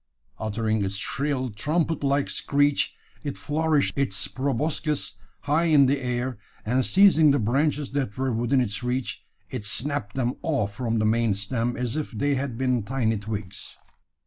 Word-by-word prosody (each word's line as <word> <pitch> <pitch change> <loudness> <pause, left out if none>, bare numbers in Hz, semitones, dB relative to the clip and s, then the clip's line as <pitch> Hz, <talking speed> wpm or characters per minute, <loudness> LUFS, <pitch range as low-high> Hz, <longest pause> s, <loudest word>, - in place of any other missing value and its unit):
Uttering 110 0 -1
its 95 0 -2
shrill, 130 +4 -1
trumpet 155 +8 -1
like 140 0 +2
screech, 145 0 +1 0.3
it 145 -2 -4
flourished 155 -1 +1
its 135 -8 +2
proboscis 145 +3 -1 0.3
high 150 +4 +1
in 150 -4 +6
the 140 +1 +1
air; 125 -1 -2 0.3
and 125 +4 +2
seizing 180 -2 +6
the 140 - +4
branches 140 +5 0
that 135 -7 -2
were 130 -1 0
within 120 +4 +2
its 105 -3 -1
reach, 125 +1 -2 0.3
it 125 -5 -4
snapped 110 0 +1
them 125 -1 0
off 130 -11 -1
from 115 -1 -1
the 110 - +1
main 110 -1 +2
stem 115 +4 -1
as 125 0 -2
if 155 -1 -2
they 140 +6 0
had 135 -3 -2
been 125 -2 +1
tiny 115 0 0
twigs. 100 -2 -5
130 Hz, 160 wpm, -25 LUFS, 115-145 Hz, 0.3 s, in